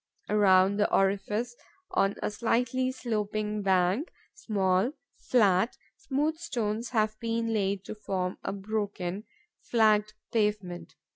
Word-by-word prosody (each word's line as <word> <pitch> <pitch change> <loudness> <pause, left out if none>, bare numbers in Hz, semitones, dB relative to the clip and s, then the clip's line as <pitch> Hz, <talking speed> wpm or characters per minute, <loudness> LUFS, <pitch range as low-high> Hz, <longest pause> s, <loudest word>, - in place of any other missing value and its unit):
Around 195 -1 +5
the 205 - +2
orifice, 205 +5 +1 0.4
on 195 0 +2
a - - 0
slightly 245 +3 0
sloping 215 -3 -2
bank, 190 - +2 0.2
small, 200 - +1 0.4
flat, 210 -2 +3 0.2
smooth 310 -2 -1
stones 235 -8 -2
have 215 -2 0
been 230 0 -1
laid 200 -2 0
to - - -5
form 190 -3 -3
a - - -2
broken, 200 -1 -3 0.4
flagged 215 -2 +3 0.2
pavement. 210 -5 -1
210 Hz, 115 wpm, -29 LUFS, 195-230 Hz, 0.4 s, Around